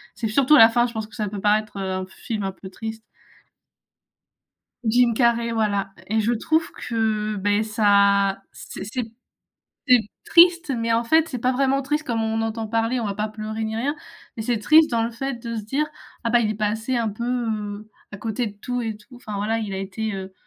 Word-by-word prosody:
C'est 225 - -2
surtout 265 +7 +4
à - - +7
la 225 - +10
fin, 240 +1 +2
je - - -8
pense 220 -1 -4
que 220 - -15
ça 210 -3 -2
peut 205 0 -6
paraître, 210 +1 +1
heu, 190 -1 -3
un 185 0 -2
film 210 +2 -5
un 195 - -2
peu 190 0 -11
triste. 220 +3 -7 1.8
Jim 240 +1 +3
Carrey, 235 -1 +2
voilà 205 -3 0 0.2
et 220 +2 +1
je 220 +2 +1
trouve 315 +8 0
que, 215 -2 -1
beh, 205 +2 +1
ça 200 -2 +3
c'est - - -8
c'est 225 +2 -4 0.8
c'est 250 -2 +7 0.3
triste, 345 -2 +5
mais 230 0 0
en 230 - +2
fait, 320 +6 +3
c'est 255 - -4
pas 250 - +2
vraiment 270 +1 +1
triste 300 +2 -2
comme 230 -2 -1
on 220 0 -1
en - - 0
entend 225 0 -3
parler. 230 +3 0
On 225 - -2
va 200 - -3
pas 210 +2 -2
pleurer, 215 +1 -5
ni 220 0 -3
rien. 275 +6 -1 0.4
Mais 220 - -3
c'est 235 0 0
triste 310 +6 +6
dans 230 -1 +1
le 230 - -1
fait 270 +4 -4
de 230 0 -4
se 220 - -3
dire: 270 +8 -1 0.4
«Ah, 230 - +1
bah, 240 - +5
il 220 - +1
est - - -2
passé 220 +4 -1
un 230 -2 0
peu, 215 +3 -5
heu, 215 -4 -3 0.2
à - - -6
côté 225 +3 -2
de 210 - -5
tout 245 +4 -3
et 220 -2 -3
tout». 230 +4 -16
Enfin, 215 -4 -8
voilà, 215 +3 0
il 215 -3 -4
a - - -3
été, 200 +2 -4
heu, 190 0 -6
225 Hz, 225 wpm, -23 LUFS, 210-240 Hz, 1.8 s, la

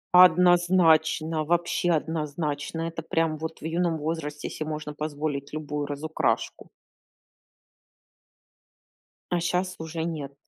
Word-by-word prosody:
Однозначно, 175 -3 +5
вообще 175 +2 +1
однозначно! 155 -1 -2
Это 165 0 -4
прям 160 -1 0
вот 160 +1 -6
в - - -8
юном 165 0 0
возрасте 150 -1 -4
се - - -5
можно 150 -1 -5
позволить 145 -2 -3
любую 150 -1 -3
разукрашку. 150 +2 -2 2.6
А 175 - +1
щас 180 +2 -1
уже 160 0 -4
нет. 150 -5 -4
160 Hz, 105 wpm, -26 LUFS, 150-170 Hz, 2.6 s, Однозначно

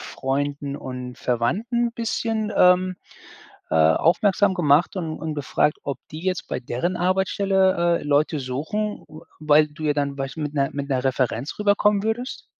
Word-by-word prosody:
Freunden 140 +1 -3
und 125 -2 -7
Verwandten 215 - 0
'n - - -11
bisschen, 225 -1 -2
ähm, 180 0 +4 0.7
äh, - - 0
aufmerksam 180 - +3
gemacht 155 +2 +3
und 160 -4 -4
und 155 -1 -4
gefragt, 145 +1 0
ob 140 -3 -4
die 155 +2 -8
jetzt 185 -2 -2
bei - - -3
deren 155 +9 -2
Arbeitsstelle, 190 -1 +2
äh, - - -9
Leute 145 +1 +1
suchen, 160 +12 -3
w 155 +1 -12 0.2
weil 150 0 +4
du 150 +1 -11
ja 150 -1 +2
dann 140 -1 -1
Beispiel 135 +3 -5
mit 150 0 -4
'ner 140 -1 +1
mit 140 0 -4
'ner 130 -1 0
Referenz 130 - -1
rüberkommen 205 0 +3
würdest? 225 +4 -3
155 Hz, 160 wpm, -23 LUFS, 140-190 Hz, 0.7 s, ähm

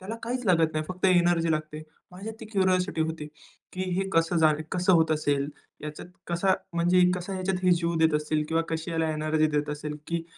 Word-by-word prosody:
त्याला 195 +4 -6
काहीच 245 +2 -3
लागत 165 -3 +3
नाही, 155 0 -2
फक्त 185 +1 -6
एनर्जी 175 -2 +3
लागते. 155 0 -4 0.3
माझ्यात 200 +5 -7
ती - - -7
क्युरिओसिटी 185 -2 +1
होती 160 -1 -2 0.5
की 185 - -3
"हे 195 0 -1
कसं 165 +1 +2
जा 155 -1 +5 0.2
कसं 185 +1 +2
होत 160 -2 +4
असेल? 145 -2 0 0.3
याच्यात 150 +2 -7 0.2
कसा, 180 +2 +2 0.2
म्हणजे 175 +2 +3
कसा 180 +2 -5
ह्याच्यात 185 0 -2
हे 180 - +5
जीव 170 0 0
देत 160 -1 +3
असतील? 150 0 0
किंवा 165 +1 +1
कशी 160 +1 -3
याला 160 -1 0
एनर्जी 155 0 +1
देत 150 0 -1
असेल? 150 0 -5
की 170 0 -2
165 Hz, 195 wpm, -27 LUFS, 155-185 Hz, 0.5 s, जा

